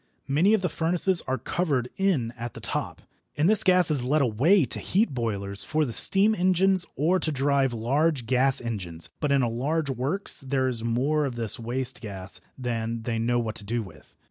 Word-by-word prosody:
Many 170 +10 +3
of 200 - -3
the - - +2
furnaces 170 +2 +2
are 130 0 0
covered 135 -1 -1
in 170 -13 0
at 120 0 -7
the - - -7
top, - - -3 0.3
and 150 +3 +3
this 215 +1 +5
gas 180 -3 +4
is 140 -5 0
led 145 +3 +2
away 140 - +3
to 110 - -3
heat 195 -5 0
boilers 100 -5 -2
for 155 0 0
the 120 - -5
steam 200 - +4
engines 185 -1 +2
or 170 +7 +2
to 160 - -2
drive 140 -1 +1
large 135 +4 0
gas 130 +2 +2
engines, 90 -9 -5
but 150 - -1
in 140 -2 +3
a - - +1
large 140 +6 -1
works 140 - -1
there 130 -1 0
is 120 -3 -2
more 135 +6 0
of 130 -3 -4
this 115 -2 -3
waste 125 +2 -3
gas 95 -4 -7 0.2
than 115 -2 -3
they 115 -1 -2
know 120 +2 +1
what 115 -2 -2
to - - -5
do 115 +3 -2
with. 80 -6 -16
130 Hz, 200 wpm, -26 LUFS, 115-160 Hz, 0.3 s, this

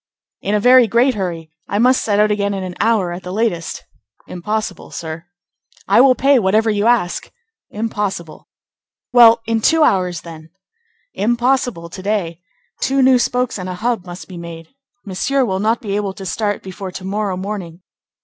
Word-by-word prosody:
"In 205 +2 -1
a - - +2
very 250 +2 +6
great 240 +5 +3
hurry. 170 -6 -4 0.2
I 205 - -1
must 250 +4 +3
set 205 -2 +1
out 210 0 +4
again 200 -1 0
in 190 - -4
an 185 -1 -5
hour 210 -5 +2
at 175 +2 -6
the 180 - -7
latest." 190 -5 -2 0.4
"Impossible, 205 +1 -4
sir." 160 0 -7 0.6
"I 200 +5 +5
will 260 -1 +6
pay 275 0 +4
whatever 220 +2 +2
you 210 +1 +1
ask." 235 -7 +1 0.4
"Impossible." 205 -6 -4 0.7
"Well, 230 -1 +7
in 225 0 0
two 320 +7 +4
hours, 180 - +1
then." 160 -1 -11 0.6
"Impossible 240 -4 0
to 175 +3 -9
day. 185 -4 -2 0.4
Two 270 0 +1
new 255 -1 +5
spokes 250 -2 -1
and 185 0 -5
a 180 - -4
hub 225 -1 -2
must 175 +1 -9
be 185 - -10
made. 165 -1 -9 0.4
Monsieur 255 +8 0
will 190 -4 -2
not 220 +3 +1
be 200 -3 -3
able 205 -2 -2
to 195 - -8
start 205 +2 -2
before 190 0 -7
to 185 - -7
morrow 200 -1 -2
morning." 185 -3 -6
205 Hz, 175 wpm, -18 LUFS, 180-230 Hz, 0.7 s, Well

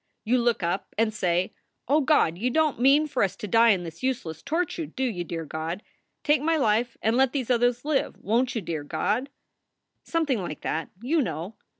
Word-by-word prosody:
You 250 +3 +2
look 235 -5 +1
up 175 +3 -2
and 220 0 +2
say, 180 -3 0 0.3
O 295 +4 +4
God, 280 - +3
you 230 +8 -1
don 310 +2 +2
t - - -8
mean 280 +4 +5
for 275 -4 -2
us 195 - +1
to 210 - -6
die 230 +4 +5
in 190 -5 +3
this 165 -1 -9
useless 235 - -2
torture, 330 0 -2
do 265 - -4
you, 210 -9 -1
dear 165 -1 -5
God? 160 +6 -4 0.4
Take 295 -2 +3
my 325 +2 +2
life 235 -2 +1
and 225 +2 +2
let 265 0 +3
these 260 -4 -1
others 245 +1 +2
live. 300 -3 0
Won 235 +5 +1
t 250 - -4
you, 205 - -4
dear 160 -3 -3
God? 210 - -1 0.7
"Something 295 - 0
like 165 -4 -6
that, 160 0 -2
you 310 +5 +2
know. 175 - -4
235 Hz, 210 wpm, -26 LUFS, 180-270 Hz, 0.7 s, mean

